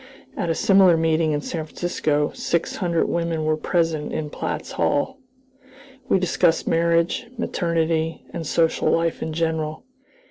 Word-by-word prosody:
At 175 -4 -2
a 165 - +1
similar 190 -3 +5
meeting 160 -1 +2
in 145 -1 -1
San 160 +1 -4
Francisco 155 -2 -1
six 170 -1 -1
hundred 170 -2 +1
women 170 -2 -1
were 155 0 +2
present 165 -2 -1
in 150 -2 -3
Platt's - - -4
Hall. 265 - 0 0.9
We - - +4
discussed 175 -2 +1
marriage, 170 +6 +1
maternity, 165 -6 -1
and 165 - -4
social 165 +1 +2
life 165 0 +1
in 160 - -3
general. 160 -1 -2
165 Hz, 140 wpm, -23 LUFS, 155-170 Hz, 0.9 s, similar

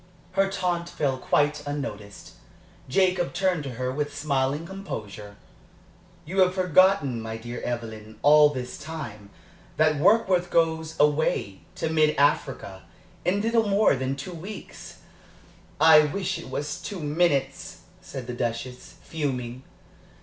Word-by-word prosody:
Her 195 +1 +2
taunt 180 -3 -2
fell 140 -6 -1
quite 150 +3 +1
unnoticed. 105 -9 -6 0.6
Jacob 180 +3 +2
turned 180 -3 0
to 135 - -5
her 125 +1 -2
with 145 +2 -3
smiling 140 +1 0
composure. 105 - -7 0.9
"You 185 +5 -3
have 185 0 +4
forgotten, 180 -8 +3
my 110 0 -5
dear 120 +2 -7
Evelyn, 110 -3 -6
all 150 0 +7
this 125 -3 -6
time, 140 -10 -8 0.5
that 155 -1 +3
Warkworth 185 -1 +3
goes 160 -1 0
away 150 -10 +1 0.2
to - - -2
mid 155 -1 +3
Africa 135 -9 0 0.4
in 200 +3 +1
little 225 -1 +1
more 200 -5 +4
than 130 +1 -2
two 140 +6 -7
weeks." 190 +5 -9 0.8
"I 160 0 +8
wish 190 +3 -2
it 165 - -10
was 145 +3 -4
two 200 - -6
minutes," 150 +2 0 0.2
said 135 -8 -8
the 125 - -5
Duchess, 120 +1 -4
fuming. 130 -5 -4
150 Hz, 130 wpm, -25 LUFS, 130-175 Hz, 0.9 s, I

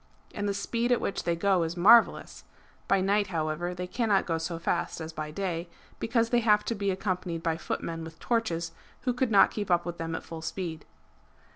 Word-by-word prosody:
And 205 0 -2
the - - 0
speed 235 +4 -1
at 245 - +4
which - - -3
they 170 - +1
go 190 +1 +2
is 165 +1 -2
marvellous. 225 +6 +5 0.4
(By 195 -1 +3
night, 200 +1 +2
however, 170 0 -2
they 180 0 -4
cannot 210 0 +1
go 165 -2 -1
so 165 +1 -3
fast 165 - -1
as 160 0 -6
by 155 -1 -4
day, 170 0 -3 0.3
because 230 0 +1
they 240 - +4
have 210 -2 +3
to - - -1
be 200 -2 -1
accompanied 185 -3 -2
by 165 -1 0
footmen 165 0 -4
with 160 0 -9
torches, 170 -9 -1 0.3
who 255 -1 0
could 255 0 0
not 205 -3 +6
keep 205 -2 -4
up 175 -1 +3
with 175 -1 -5
them 165 0 -3
at - - -5
full 165 -1 -8
speed.) 160 -1 -5
180 Hz, 210 wpm, -28 LUFS, 165-210 Hz, 0.4 s, not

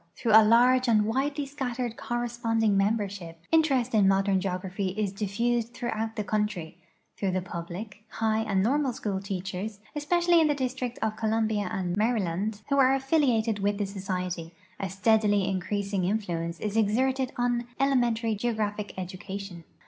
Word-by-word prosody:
Through 240 -4 -1
a 220 +1 +9
large 250 +3 +5
and 215 -3 +4
widely 275 +5 -1
scattered 250 -4 -3
corresponding 235 -3 0
membership, 195 -5 -1
interest 275 -7 +3
in 205 -3 +5
modern 195 0 +3
geography 185 0 -3
is 205 -3 -1
diffused 230 +4 -1
through 240 -1 -3
out 225 0 -3
the 215 - -2
country; 210 -6 -2 0.4
through 195 - -1
the 185 - 0
public, 185 +5 -7
high, 220 0 0
and 200 -4 +1
normal 270 +3 +1
school 200 -4 -3
teachers, 195 +1 -4 0.2
especially 345 +3 +3
in 315 - +4
the 295 - +1
District 255 -2 -3
of 215 0 -1
Columbia 220 -3 0
and 180 -2 -2
iUaryland, 210 -2 0
who 280 0 +2
are 265 0 +5
affiliated 260 -6 +1
with 200 +1 0
the 205 - -1
Society, 185 -4 -4 0.2
a 195 - -2
steadily 205 0 +2
increasing 195 +1 -1
influ 180 -3 -1
ence 170 0 -6
is 210 0 -3
exerted 255 +5 +1
on 240 0 0
elementary 240 -5 +2
geographic 210 -2 -2
education. 190 -1 -7
215 Hz, 155 wpm, -27 LUFS, 195-240 Hz, 0.4 s, a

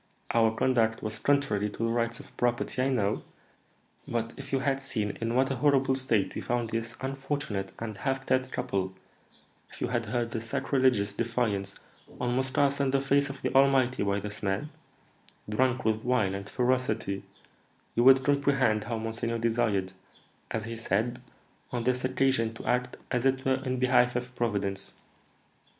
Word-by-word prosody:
Our 115 -1 +3
conduct 115 -3 +2
was 110 0 -4
contrary 135 -8 +1
to 110 - -5
the 115 - 0
rights 115 0 0
of - - -14
property, 120 +1 0
I 130 - +2
know; 110 -5 +1 0.9
but 115 -1 -2
if 140 0 -9
you 135 -1 +1
had 135 0 0
seen 110 -6 -2
in 115 +1 -1
what 135 +1 +3
a 135 - -1
horrible 135 0 +3
state 115 -8 +1
we - - -4
found 120 -2 -1
this 115 +1 -3
unfortunate 135 -7 -3
and 110 -3 -6
half 135 +4 -1
dead 130 0 +1
couple, 95 -1 -2 0.8
if - - -13
you - - -1
had 120 -2 -1
heard 120 +1 -1
the 115 - -3
sacrilegious 115 -3 +1
defiance 110 -4 -1 0.4
almost 130 +2 -1
cast 140 0 +3
in 140 - +2
the 135 +1 +2
face 140 +1 +2
of 135 -1 -8
the - - -1
Almighty 135 -2 +4
by 100 0 +1
this 105 +1 -7
man, 105 +10 -1 0.8
drunk 125 +3 +1
with 110 0 +1
wine 120 -6 +2
and 100 +1 -5
ferocity, 125 -6 0 0.7
you 120 - +2
would 130 +1 +7
comprehend 140 -6 +2
how 115 -1 -2
monseigneur 115 +1 -2
desired, 110 -5 0 0.6
as 110 -1 -3
he 115 0 -5
said, 115 +3 -1 0.5
on 120 -2 -2
this 125 +1 +1
occasion 130 -3 +1
to - - -9
act 125 0 0
as 125 -2 +1
it 135 0 +1
were 130 0 +1
in 130 -1 -1
behalf 125 -1 +3
of 125 +1 -3
Providence." 100 -5 -2
120 Hz, 170 wpm, -29 LUFS, 110-130 Hz, 0.9 s, would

